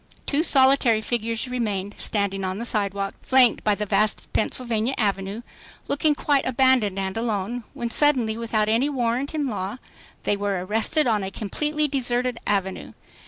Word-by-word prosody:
Two 290 +2 +1
solitary 265 -6 +4
figures 230 +1 -2
remained, 210 -5 -3
standing 200 -2 -1
on 185 0 -3
the 235 - -4
sidewalk, 200 -3 -1
flanked 255 -3 +4
by 210 -1 +2
the 210 - -3
vast 210 +1 0
Pennsylvania 235 +2 0
Avenue, 200 +1 -1 0.4
looking 295 +1 +1
quite 285 -1 +1
abandoned 255 -6 +2
and 190 -1 -3
alone, 225 +1 -2
when 240 -4 -4
suddenly 255 -7 +3
without 225 -2 -1
any 230 +6 +2
warrant 255 +2 -1
in 300 -2 -1
law, 205 -2 -4 0.5
they 205 - +1
were 200 -3 -2
arrested 225 +10 +2
on 220 -4 +1
a 190 - -3
completely 300 +10 -2
deserted 250 -3 0
avenue. 190 -2 -2
230 Hz, 155 wpm, -23 LUFS, 205-260 Hz, 0.5 s, solitary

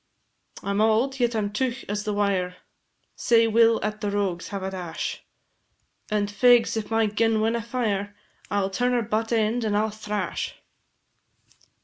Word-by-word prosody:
"I 200 - -2
'm 200 +1 +1
auld, 230 +5 +2
yet 240 -1 +1
I - - +1
'm 205 -1 -1
teugh 260 +3 -2
as 205 +1 -3
the 210 - -1
wire, 195 -3 0 0.6
Sae 230 -1 +4
we 225 +1 +5
'll 230 0 +4
at 215 0 -4
the 205 - -1
rogues 195 -4 -1
have 200 -1 -5
a 190 - -3
dash, 180 -3 -5 0.9
And, 210 -1 +1
fegs, 235 +4 +4
if 220 -2 -3
my 225 0 +2
gun 220 +1 +1
winna 225 +2 +1
fire, 210 -4 -2 0.3
I 205 - +1
'll 195 0 -2
turn 245 +5 +1
her 240 -1 +1
butt 220 +1 -2
end, 225 +1 +1
and 210 -2 +1
I 210 - +3
'll 220 - -2
thrash." 210 -3 -4
215 Hz, 180 wpm, -25 LUFS, 205-230 Hz, 0.9 s, we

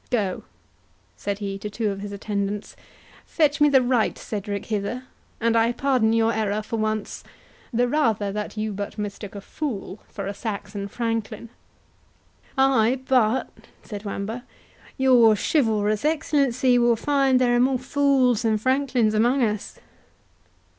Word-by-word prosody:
—Go," 205 -6 -1 0.7
said 200 -1 -3
he 200 -1 -4
to 210 - -5
two 215 0 -1
of 195 - -6
his 205 0 -6
attendants, 200 0 -3 0.5
"fetch 300 -2 +1
me 295 - +6
the 265 -2 +5
right 245 -3 +1
Cedric 200 -1 -5
hither, 215 +4 -3 0.4
and 230 0 +1
I 230 +1 +3
pardon 250 -3 +1
your 225 0 +2
error 215 -1 -1
for 230 - -4
once; 215 -1 -2 0.5
the 245 +1 +2
rather 225 -8 +1
that 210 +2 -5
you 215 0 -2
but 200 +2 -5
mistook 205 -1 -6
a 200 - -6
fool 210 -6 -5
for 200 - -6
a 200 - -3
Saxon 205 -1 -5
franklin." 230 +1 -3 1.1
"Ay, 265 -2 +3
but," 250 -1 +2 0.3
said 205 -1 -7
Wamba, 215 +4 -4 0.5
"your 245 -5 +5
chivalrous 215 -4 +1
excellency 275 -5 +2
will 240 -1 +4
find 270 +1 +2
there 245 -1 +3
are - - +3
more 260 +1 +3
fools 260 -3 +2
than 220 -2 +2
franklins 255 -2 +1
among 240 +5 +3
us." 210 -2 -2
225 Hz, 145 wpm, -24 LUFS, 210-255 Hz, 1.1 s, me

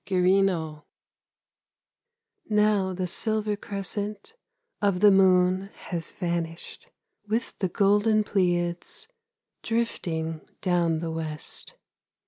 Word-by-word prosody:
GYRINNO 180 -5 +2 1.7
Now 210 -3 +3
the 185 0 -2
silver 215 +3 -1
crescent 205 - -4 0.5
Of 200 -3 +2
the 205 +1 +7
moon 185 0 +4
has 170 -3 -4
vanished, 170 -2 -4 0.4
With 225 +3 -1
the 190 - 0
golden 210 +3 +3
Pleiads 175 - 0 0.5
Drifting 165 -9 -2 0.2
down 170 -3 +1
the 165 -1 -3
west. 155 -2 -4
185 Hz, 90 wpm, -26 LUFS, 170-205 Hz, 1.7 s, the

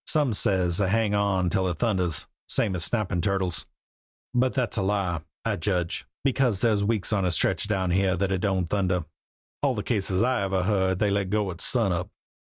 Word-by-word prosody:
Some 145 -7 +3
says 90 -3 +1
they 95 -2 +1
hang 110 0 +1
on 100 -3 +1
till 95 -2 +1
it 90 -3 -2
thunders, 90 -9 0 0.2
same 95 - +1
as 85 - +1
snappin' 105 -7 -1
turtles. 95 -2 -1 0.7
But 125 +1 +1
that's 125 -3 -1
a - - +1
lie, 95 -4 0 0.2
I - - 0
judge, 90 0 -1 0.2
because 130 -7 +1
there's 105 -3 +2
weeks 105 0 0
on 100 -2 +1
a 90 - +2
stretch 85 +4 +2
down 95 -4 0
here 95 0 +2
when 95 +1 0
it 95 - 0
don't 95 -3 +1
thunder. 90 -2 0 0.6
All 140 -3 +1
the 105 - -3
cases 100 -3 0
I 125 -1 +1
ever 95 -1 0
heard 95 -2 +1
of - - -4
they 105 0 +1
let 100 -1 0
go 105 -1 0
at 85 - -9
sunup." 95 -7 +1
95 Hz, 200 wpm, -26 LUFS, 90-105 Hz, 0.7 s, Some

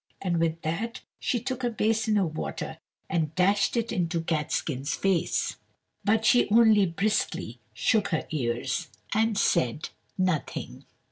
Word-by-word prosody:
and 175 -3 0
with 165 0 0
that 205 +10 -3 0.2
she 245 - 0
took 255 +2 -4
a 240 - +2
basin 220 -1 +1
of 170 -6 0
water 160 0 -4 0.3
and 160 -3 -1
dashed 195 +4 +3
it 230 -1 0
into 170 -1 0
Catskin's 155 -3 -1
face. 190 -4 0 0.5
But 220 +2 +2
she 245 0 +5
only 215 -2 +6
briskly 170 - -1
shook 205 - +2
her 160 - -1
ears, 125 -3 -1 0.3
and 220 0 +2
said 130 -6 +1 0.3
nothing. 185 -5 -2
185 Hz, 135 wpm, -27 LUFS, 160-215 Hz, 0.5 s, only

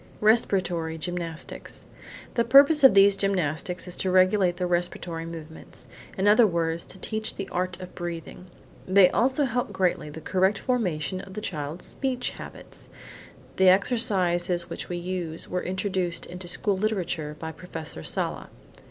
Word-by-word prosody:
RESPIRATORY 185 -7 +2
GYMNASTICS 170 -1 -6 0.5
The 235 - +2
purpose 275 +5 +6
of 265 -7 +8
these 200 0 +7
gymnastics 180 -2 -1
is 180 - -7
to 190 - -1
regulate 185 -1 +3
the 180 - -1
respiratory 175 -1 -2
movements: 160 -1 -10 0.3
in 195 +2 +1
other 215 +2 +6
words, 165 -2 -1
to - - -10
teach 220 +3 -3
the 195 - -5
art 180 0 -2
of 180 -1 -9
breathing. 175 +1 -7 0.4
They 190 0 +6
also 260 +4 +2
help 245 -3 -2
greatly 185 -5 0
the 150 - -8
correct 190 +5 +1
formation 185 - -1
of 195 -1 -12
the - - -3
child's 155 -3 -5
speech 255 -2 -2
habits. - - -10 0.7
The 190 -1 +6
exercises 185 -5 +2
which - - -6
we 175 - -3
use 175 -2 -3
were 180 - -2
introduced 185 -2 -2
into 180 +1 -8
school 195 +3 0
literature 180 -7 -2
by 160 0 -5
Professor 160 - -8
Sala. - - -2
185 Hz, 150 wpm, -26 LUFS, 170-200 Hz, 0.7 s, of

